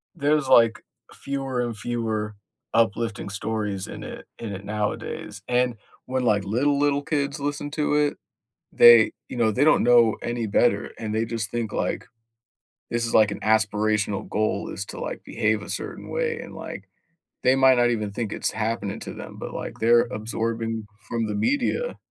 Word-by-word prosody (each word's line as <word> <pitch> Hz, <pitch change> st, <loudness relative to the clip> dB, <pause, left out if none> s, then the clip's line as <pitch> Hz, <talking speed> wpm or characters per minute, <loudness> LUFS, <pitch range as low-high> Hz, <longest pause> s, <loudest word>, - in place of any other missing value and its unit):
there's, 150 Hz, -2 st, +1 dB
like, 115 Hz, -1 st, +5 dB, 0.3 s
fewer 135 Hz, -2 st, -3 dB
and 120 Hz, -2 st, -3 dB
fewer 110 Hz, -2 st, -2 dB, 0.4 s
uplifting 115 Hz, -1 st, +1 dB
stories 105 Hz, -1 st, -3 dB
in -, -, -8 dB
it -, -, -8 dB
in 115 Hz, -3 st, -5 dB
it 95 Hz, +1 st, -7 dB
nowadays, 105 Hz, 0 st, -4 dB
and 125 Hz, -1 st, +1 dB, 0.3 s
when, 130 Hz, 0 st, -1 dB
like, 105 Hz, -4 st, +2 dB
little 130 Hz, +9 st, +1 dB
little 145 Hz, 0 st, +2 dB
kids 140 Hz, -1 st, -1 dB
listen 145 Hz, 0 st, -3 dB
to 150 Hz, -1 st, 0 dB
it, 150 Hz, -1 st, +2 dB, 0.6 s
they, 120 Hz, -2 st, +8 dB, 0.2 s
you -, -, -6 dB
know, 115 Hz, -2 st, +3 dB
they 130 Hz, +7 st, +2 dB
don't 155 Hz, -, +5 dB
know 120 Hz, -2 st, +5 dB
any 120 Hz, -1 st, -2 dB
better, 105 Hz, 0 st, +2 dB
and 110 Hz, -1 st, -4 dB
they 110 Hz, +1 st, +1 dB
just 115 Hz, -3 st, -3 dB
think, 115 Hz, -3 st, -3 dB
like, -, -, -2 dB, 0.8 s
this 120 Hz, 0 st, 0 dB
is, 115 Hz, -, -3 dB
like, 110 Hz, -1 st, +5 dB
an -, -, -5 dB
aspirational 110 Hz, -1 st, +1 dB
goal 110 Hz, +1 st, -1 dB
is 100 Hz, -, -5 dB
to, -, -, -8 dB
like, -, -, -5 dB
behave 105 Hz, 0 st, 0 dB
a -, -, -9 dB
certain -, -, -5 dB
way, 470 Hz, -1 st, -1 dB
and, -, -, -9 dB
like, -, -, -8 dB, 0.5 s
they 130 Hz, -, +5 dB
might 130 Hz, -1 st, +6 dB
not 120 Hz, 0 st, +4 dB
even 105 Hz, -3 st, -1 dB
think 110 Hz, 0 st, -3 dB
it's -, -, -1 dB
happening 110 Hz, -2 st, -2 dB
to -, -, -6 dB
them, -, -, -9 dB
but, -, -, -6 dB
like, -, -, -6 dB
they're 120 Hz, +1 st, +5 dB
absorbing 115 Hz, 0 st, -2 dB, 0.2 s
from 115 Hz, -1 st, -1 dB
the 105 Hz, -, -3 dB
media. 290 Hz, -, 0 dB
115 Hz, 175 wpm, -24 LUFS, 110-130 Hz, 0.8 s, they